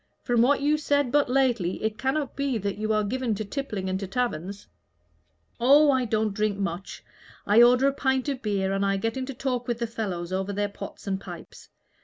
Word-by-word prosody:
From 240 -2 +2
what 275 +4 +3
you 300 +2 +2
said 285 -4 +1
but 290 -2 +3
lately, 245 -9 +1
it 220 -1 -2
cannot 270 +3 -1
be 280 -3 -1
that 200 0 -3
you 215 0 -1
are 215 0 +2
given 240 +1 -1
to 215 - -4
tippling 210 -5 -4
and 190 0 -1
to 195 - -5
taverns." 200 -3 -3 0.9
"Oh, 285 +5 +6
I 260 -2 +1
don't 215 -2 0
drink 210 -1 0
much. 190 -1 -5 0.4
I 210 +3 +6
order 250 +3 +6
a 275 - +2
pint 265 -1 0
of 275 -3 -2
beer, 195 -3 -1
and 195 0 0
I 195 0 +1
get 225 +3 -2
into 260 0 -4
talk 250 -1 -2
with 240 -2 -1
the 235 - -1
fellows 185 -6 -4
over 190 +1 -1
their 205 0 -1
pots 200 - -9
and 195 -1 -2
pipes. 175 -4 -11
225 Hz, 210 wpm, -26 LUFS, 200-260 Hz, 0.9 s, Oh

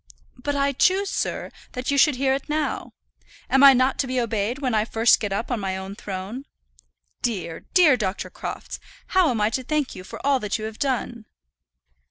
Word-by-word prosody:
"But 285 +3 -2
I 280 0 +2
choose, 380 +8 +2
sir, - - -3 0.2
that 250 +2 -2
you 280 - +1
should 300 -1 +5
hear 265 +1 +1
it 275 +3 -4
now. 305 0 -2 0.6
Am 270 +1 +5
I 275 -1 +10
not 260 +1 +2
to 270 - +1
be 255 0 -1
obeyed 230 0 -1
when 260 -4 -1
I 215 -1 +3
first 225 +1 +3
get 205 -2 -3
up 215 +6 -2
on 240 - 0
to - - -6
my 190 -1 -2
own 190 +1 -6
throne? 205 +7 -6 0.8
Dear, 185 -9 -3
dear 330 -7 +7
Dr. 200 -3 -3
Crofts, - - -6 0.3
how 370 -4 +4
am 235 -4 -1
I 210 +1 +2
to 260 - -1
thank 300 0 -1
you 185 - -9
for - - -9
all 280 -2 +3
that 210 -2 -2
you 215 - -5
have 220 0 -7
done?" 245 -4 -2
250 Hz, 210 wpm, -24 LUFS, 215-280 Hz, 0.8 s, I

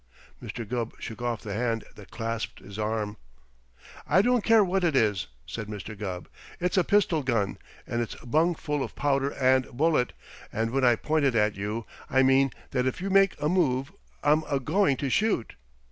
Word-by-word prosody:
Mr. 115 -3 -6
Gubb 120 -1 -3
shook 115 0 -7
off 120 -2 -2
the 105 -3 -4
hand 115 0 -1
that 105 - -14
clasped 115 -1 -4
his 100 +1 -10
arm. 105 -1 -2 0.9
"I 190 - +4
don't 245 -2 +3
care 225 -2 +6
what 190 0 0
it 165 -5 +2
is," 105 -8 +2 0.2
said 110 -3 -6
Mr. 105 +1 -7
Gubb. 95 -3 -5 0.3
"It's 180 +2 0
a 185 - +4
pistol 185 -6 +2
gun, 115 -7 0 0.3
and 120 - -2
it's 115 - -4
bung 160 +7 +1
full 150 -2 -2
of - - -5
powder 140 -1 +1
and 130 -1 +3
bullet, 145 -1 +1 0.4
and 115 +1 -1
when 135 +1 0
I 120 -2 +6
point 155 +5 0
it 130 -4 +2
at 105 -1 +3
you 105 +3 -4 0.2
I 130 +1 +4
mean 135 0 +4 0.2
that 125 -1 +1
if 130 - -2
you 195 +2 -3
make 195 -2 +4
a 150 - 0
move 145 -5 +1 0.3
I'm 150 +2 +4
a 140 -2 +1
going 155 +1 +2
to 140 - -2
shoot." 210 - +1
130 Hz, 190 wpm, -27 LUFS, 115-155 Hz, 0.9 s, care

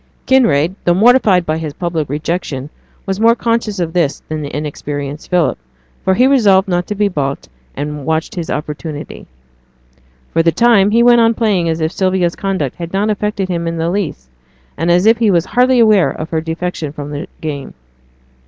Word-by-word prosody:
Kinraid, 180 - +3
though 175 - +3
mortified 215 -4 +4
by 155 0 -1
his 155 -3 -5
public 165 -5 -3
rejection, 150 -2 -3 0.3
was 195 0 -3
more 230 +1 +5
conscious 230 -3 -1
of 165 -2 -2
this 165 -5 0
than 155 0 -3
the 145 - -5
inexperienced 145 0 -5
Philip; 180 - +1 0.6
he 250 - +4
resolved 210 -8 +4
not 175 -1 -1
to 210 - -3
be 205 0 +2
baulked, 140 -7 -3 0.3
and 150 0 -4
watched 160 +2 -1
his 170 -3 -5
opportunity. 150 0 -6 1.1
For 165 - +3
the 165 0 +3
time 225 -2 +4
he 230 +3 +3
went 240 -1 +6
on 230 0 +3
playing 200 -7 +1
as 160 0 -2
if 160 +1 0
Sylvia's 185 -2 0
conduct 190 -10 -3
had 170 -1 -6
not 205 +2 +1
affected 210 -2 -2
him 170 -2 -2
in 165 0 -3
the 165 +1 -1
least, 180 - -3 0.5
and 165 - -1
as 175 +3 +3
if 225 +1 +4
he 225 -3 +3
was 170 -3 +2
hardly 250 +1 +2
aware 215 -6 +4
of 155 +1 -6
her 160 -1 0
defection 165 -1 -4
from 145 0 -7
the 145 +3 -5
game. 145 -3 -6
175 Hz, 185 wpm, -16 LUFS, 155-210 Hz, 1.1 s, went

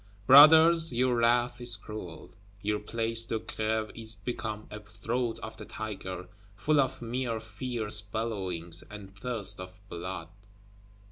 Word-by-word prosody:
Brothers, 160 +5 +8
your 125 +1 +1
wrath 120 +1 +1
is 120 -1 +2
cruel! 100 -6 -9 0.3
Your 105 0 -1
Place 115 0 0
de 115 0 -2
Grève 110 0 -3
is 110 -1 -5
become 110 -3 -5
a 105 - -7
Throat 110 +3 -4
of 110 0 -8
the - - -9
Tiger, 95 -4 -7 0.3
full 150 +7 +1
of 130 -2 -3
mere 120 -1 -3
fierce 110 -1 +2
bellowings, 95 -6 -4
and 100 -2 -11
thirst 110 -2 +2
of 90 +1 -10
blood. 85 -1 -6
110 Hz, 135 wpm, -28 LUFS, 105-120 Hz, 0.3 s, Brothers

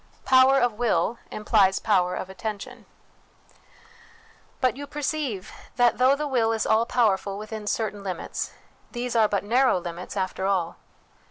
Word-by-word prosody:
Power 265 +1 +6
of 245 -2 +2
Will 230 -1 +1
implies 205 -3 +2
Power 180 -4 +1
of - - -5
Attention. 220 +4 -7 1.7
But 255 -3 +1
you 285 +1 -7
perceive 290 -9 -3 0.2
that, 245 -2 +3
though 260 +2 +5
the 300 +1 -3
will 235 -5 +1
is 220 - -1
all 220 +2 +2
power 225 -7 +3
ful 200 -1 -6
within 215 0 -7
certain 210 -2 -2
limits, 185 -3 -4 0.4
these 240 0 -3
are 220 -2 +5
but 200 -1 -1
narrow 250 +2 +3
limits 175 +2 -6
after 190 0 -2
all. 180 -4 -1
220 Hz, 150 wpm, -25 LUFS, 195-250 Hz, 1.7 s, Power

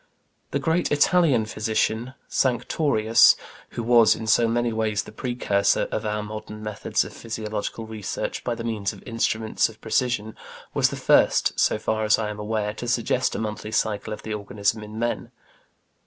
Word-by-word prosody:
The - - -1
great 165 +2 0
Italian 145 - +3
physician, 110 +3 -1
Sanctorius, 120 -2 +3 0.4
who 120 - -1
was 115 -1 +5
in 110 - -6
so 115 +2 +4
many 120 0 0
ways 110 -2 0
the - - -11
precursor 110 -5 0
of 110 0 -2
our 105 0 -2
modern 105 0 -8
methods 105 -1 -1
of - - -10
physiological 110 0 -5
research 110 -2 -4
by 120 - -1
the 115 - -6
means 110 -4 -2
of - - -14
instruments 115 -2 0
of 110 - -15
precision, 110 -2 -1 0.4
was - - +3
the - - -5
first, - - +3
so - - +3
far 110 0 -1
as 105 0 +4
I 105 -1 -2
am 105 - -8
aware, 105 0 -2
to 120 +3 -6
suggest 125 +1 +1
a - - -1
monthly 105 0 -4
cycle 110 -2 -1
of 105 - -6
the 110 - -4
organism 105 +1 -1
in 105 +1 -9
men. 120 +1 -2
110 Hz, 170 wpm, -24 LUFS, 105-120 Hz, 0.4 s, was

